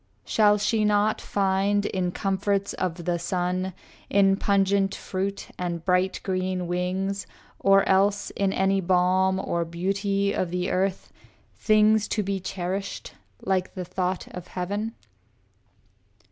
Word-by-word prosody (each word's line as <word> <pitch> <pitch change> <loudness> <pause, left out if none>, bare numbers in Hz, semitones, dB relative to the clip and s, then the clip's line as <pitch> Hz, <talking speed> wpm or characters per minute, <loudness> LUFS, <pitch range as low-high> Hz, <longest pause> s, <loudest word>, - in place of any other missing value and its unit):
Shall 210 -1 +4
she 215 +1 +1
not 210 +1 +2
find 200 +1 +1
in 180 -2 -1
comforts 195 +1 -1
of 175 -2 -3
the 175 -1 0
sun, 180 +2 -1 0.4
In 195 -1 +4
pungent 195 0 +2
fruit 195 +1 -4
and 170 -2 -3
bright 185 0 +2
green 185 -1 -1
wings, 185 +3 -2 0.3
or 195 0 +4
else 200 +1 +2
In 195 -1 0
any 195 0 +1
balm 185 +1 +2
or 170 -2 -1
beauty 195 +4 -1
of 180 - -1
the 180 +1 -2
earth, 190 +1 -1 0.4
Things 215 0 +3
to 210 - -1
be 195 0 -2
cherished 185 +1 -4 0.3
like 190 -1 -1
the 185 -1 -4
thought 185 +1 -2
of 180 0 -9
heaven? 205 +6 -3
190 Hz, 130 wpm, -25 LUFS, 180-200 Hz, 0.4 s, Shall